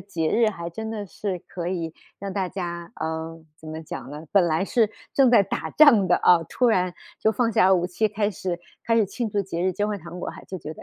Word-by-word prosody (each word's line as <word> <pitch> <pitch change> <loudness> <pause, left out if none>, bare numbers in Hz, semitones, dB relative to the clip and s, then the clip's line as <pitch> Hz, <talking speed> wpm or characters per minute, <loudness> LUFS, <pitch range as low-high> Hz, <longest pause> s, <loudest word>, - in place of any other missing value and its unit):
节 175 -4 -2
日 230 -1 +4
还 170 -4 -6
真 220 +6 -6
的 215 -2 -4
是 195 0 -4
可 175 -2 -5
以 170 -3 -3 0.3
让 200 0 -5
大 190 -1 -1
家 175 -2 -5
呃， 160 +1 -4 0.2
怎 160 - -14
么 155 +1 -5
讲 130 -4 -7
呢， 150 +2 -8
本 195 -3 +5
来 160 +3 +1
是 220 +1 +2 0.2
正 270 -3 +5
在 235 - +7
打 195 - -4
仗 260 -11 +6
的 175 - +5
啊， 175 -2 +5
突 250 - +1
然 185 -5 +2 0.3
就 220 - +3
放 235 0 +1
下 190 -2 +5
武 175 -2 +3
器， 180 +5 0
开 210 0 0
始 180 -2 -4 0.3
开 230 - +3
始 220 -3 +4
庆 230 +4 -3
祝 205 - 0
节 180 -3 -3
日， 185 0 +1
交 205 +4 -1
换 210 -1 -2
糖 170 +2 -9
果 - - -4
还 - - -12
就 190 - -6
觉 155 -1 -7
得， - - -12
185 Hz, 265 characters per minute, -24 LUFS, 170-210 Hz, 0.3 s, 在